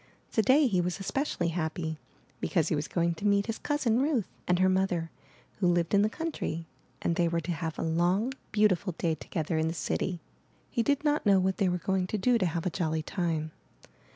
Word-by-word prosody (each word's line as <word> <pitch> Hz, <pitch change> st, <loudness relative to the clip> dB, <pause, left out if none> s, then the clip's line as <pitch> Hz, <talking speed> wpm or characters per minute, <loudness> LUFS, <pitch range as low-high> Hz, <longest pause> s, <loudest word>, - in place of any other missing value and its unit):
Today 265 Hz, +7 st, +4 dB
he 190 Hz, -8 st, +2 dB
was 180 Hz, +2 st, -2 dB
especially 195 Hz, -, -1 dB
happy 160 Hz, -1 st, -3 dB, 0.4 s
because 165 Hz, -5 st, +1 dB
he -, -, +1 dB
was 150 Hz, +1 st, -2 dB
going 170 Hz, -1 st, +1 dB
to 185 Hz, +6 st, -2 dB
meet 200 Hz, 0 st, +3 dB
his 225 Hz, -1 st, -4 dB
cousin, 255 Hz, -5 st, +1 dB
Ruth, 275 Hz, -, +1 dB, 0.2 s
and 180 Hz, -, +3 dB
her 185 Hz, +1 st, +4 dB
mother, 185 Hz, -3 st, +1 dB, 0.5 s
who 185 Hz, -, +2 dB
lived 175 Hz, 0 st, +1 dB
in 200 Hz, -, +6 dB
the 210 Hz, -, +3 dB
country, 220 Hz, -, -4 dB, 0.4 s
and 170 Hz, -, +1 dB
they 170 Hz, 0 st, +2 dB
were 170 Hz, 0 st, 0 dB
to 170 Hz, +3 st, -3 dB
have 160 Hz, -1 st, -3 dB
a -, -, -2 dB
long, 175 Hz, +9 st, +1 dB, 0.2 s
beautiful 205 Hz, -3 st, +2 dB
day 165 Hz, -2 st, +1 dB
together 160 Hz, 0 st, -2 dB
in 160 Hz, -, +1 dB
the 165 Hz, -, -2 dB
city. 175 Hz, +2 st, -2 dB, 0.5 s
He 235 Hz, -, +1 dB
did 285 Hz, +5 st, +1 dB
not 295 Hz, -6 st, +1 dB
know 195 Hz, -1 st, +6 dB
what 190 Hz, 0 st, +1 dB
they 195 Hz, -, +2 dB
were 180 Hz, -, 0 dB
going 190 Hz, +1 st, 0 dB
to 215 Hz, -, -2 dB
do 235 Hz, +4 st, +3 dB
to 185 Hz, -, +2 dB
have 165 Hz, 0 st, -3 dB
a 180 Hz, -, 0 dB
jolly 160 Hz, -3 st, -1 dB
time. 160 Hz, -3 st, -2 dB
180 Hz, 210 wpm, -29 LUFS, 165-210 Hz, 0.5 s, in